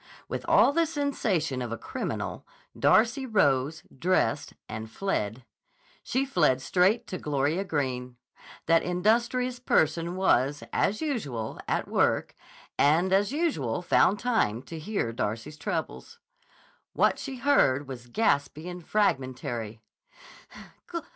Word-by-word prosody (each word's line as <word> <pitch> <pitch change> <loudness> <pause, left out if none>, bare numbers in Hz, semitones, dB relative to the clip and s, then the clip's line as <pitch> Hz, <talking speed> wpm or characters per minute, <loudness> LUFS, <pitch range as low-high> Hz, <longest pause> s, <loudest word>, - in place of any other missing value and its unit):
With - - -4
all 280 - +5
the 335 +1 +2
sensation 215 - -1
of 120 -2 -4
a 115 - -3
criminal, - - -4 0.3
Darcy 240 +5 +3
rose, 150 - +1
dressed, 140 -5 0
and 110 0 -6
fled. 115 - -3 0.6
She 265 +2 -1
fled 155 - +2
straight 185 - +2
to 185 - -6
Gloria 150 +5 0
Greene. 125 -7 -3 0.5
That 165 0 +4
industrious 235 +7 +1
person 165 -6 +1
was, 145 -7 +2
as 215 +9 +1
usual, 140 - -3
at - - -1
work, - - +1 0.5
and 170 +6 +4
as 200 +3 +3
usual 225 - -1
found 195 +2 +4
time 205 - 0
to 165 +2 -8
hear 155 - -2
Darcy's 115 +7 -3
troubles. 175 - -4 0.8
What - - +2
she 270 -2 -5
heard 145 - +2
was 125 -2 -8
gaspy 150 - 0
and 180 -1 -7
fragmentary. 130 - -1
165 Hz, 120 wpm, -27 LUFS, 130-220 Hz, 0.8 s, all